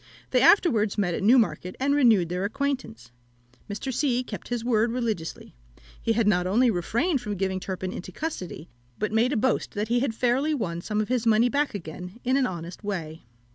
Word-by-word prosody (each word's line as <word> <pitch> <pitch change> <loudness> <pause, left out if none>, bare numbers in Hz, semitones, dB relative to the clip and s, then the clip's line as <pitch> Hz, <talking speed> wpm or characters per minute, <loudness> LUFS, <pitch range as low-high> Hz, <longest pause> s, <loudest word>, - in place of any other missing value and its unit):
They - - +3
afterwards 230 - +4
met 185 -4 +1
at - - -3
Newmarket, 215 -4 +3
and 280 +2 +2
renewed 225 - +4
their 180 +2 -2
acquaintance. 235 - -3 0.6
Mr. 235 +6 -4
C. 250 -1 +1
kept - - -8
his 240 -1 -3
word 230 -1 +2
religiously; 225 -9 -3 0.5
he 230 - 0
not 180 -4 +2
only 235 +6 +3
refrained 235 - 0
from 210 -3 -4
giving 190 0 -1
Turpin 185 0 -4
into 185 - -7
custody, 185 - -5 0.3
but 215 0 -2
made 230 +4 +2
a 280 - 0
boast 245 +3 0
that 210 +1 -2
he 240 +1 +3
had 245 -3 -1
fairly 260 +6 +1
won 170 -9 -3
some 210 +3 -1
of 215 - -4
his 245 -2 0
money 225 +2 +4
back 285 -2 0
again 180 +3 -8
in 255 +2 +1
an 270 -2 +2
honest 175 +2 -7
way. 165 -6 -4
220 Hz, 190 wpm, -26 LUFS, 185-250 Hz, 0.6 s, afterwards